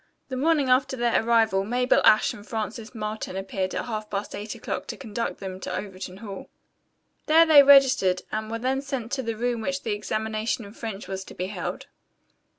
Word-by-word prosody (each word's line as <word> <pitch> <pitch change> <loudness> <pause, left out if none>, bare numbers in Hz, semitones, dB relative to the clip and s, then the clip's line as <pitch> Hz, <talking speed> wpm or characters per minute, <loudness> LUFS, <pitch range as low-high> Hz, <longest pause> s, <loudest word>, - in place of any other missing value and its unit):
The 260 - -3
morning 295 +1 +2
after 255 +1 +2
their 235 -2 +2
arrival 225 -4 +3
Mabel 250 +4 +2
Ashe 215 - +5
and 205 - -11
Frances 220 +2 -5
Marlton 215 -3 -4
appeared 190 -1 -3
at - - -2
half 215 -2 -4
past 200 0 -4
eight 210 +1 -5
o'clock - - -5
to - - -6
conduct 230 +2 -4
them 190 -1 -6
to - - -4
Overton 190 -2 -7
Hall. 200 -2 -8 0.8
There 325 +2 +7
they 310 -3 +9
registered 265 -10 +5
and 215 0 -3
were 230 - -2
then 260 +3 -1
sent 265 -4 -5
to 265 - -1
the 230 -3 -4
room 240 0 -1
where 250 - -1
the 260 -5 -3
examination 215 +2 -2
in 200 - -12
French 215 -4 -6
was 190 0 -4
to - - -12
be 180 - -3
held. 200 - -5
220 Hz, 195 wpm, -25 LUFS, 205-250 Hz, 0.8 s, they